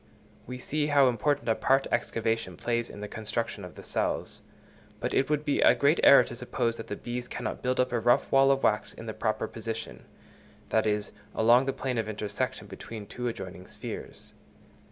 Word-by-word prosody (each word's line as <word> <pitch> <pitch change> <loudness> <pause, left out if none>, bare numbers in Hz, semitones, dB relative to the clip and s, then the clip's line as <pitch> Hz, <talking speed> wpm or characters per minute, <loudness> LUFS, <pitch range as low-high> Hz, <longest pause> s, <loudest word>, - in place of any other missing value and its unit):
We 125 +1 -5
see 145 +4 -1
how 140 -2 +5
important 125 +5 0
a 115 - +4
part 135 +4 +2
excavation 115 -5 -1
plays 120 -1 -1
in 100 - -9
the 105 - -4
construction 110 +2 -3
of - - -9
the - - -10
cells; - - -2 0.6
but - - -2
it 135 - +2
would 150 0 0
be 145 - +1
a - - +6
great 145 +3 +3
error 140 -2 +9
to 120 - -8
suppose 120 -1 -1
that 115 - -7
the 105 - -4
bees 120 +2 -5
cannot - - -4
build 130 0 0
up 125 - +2
a 120 - +1
rough 120 +2 +3
wall 135 0 +6
of 135 0 +2
wax 105 0 +1
in - - -9
the - - -4
proper - - -1
position—that 110 0 -5
is, 105 -1 -1 0.2
along 120 +4 +5
the - - +2
plane 130 -3 -2
of 110 -1 -2
intersection 105 -1 -3
between 110 -2 -8
two 125 +4 -5
adjoining 95 -5 -6
spheres. - - -8
120 Hz, 195 wpm, -28 LUFS, 110-135 Hz, 0.6 s, error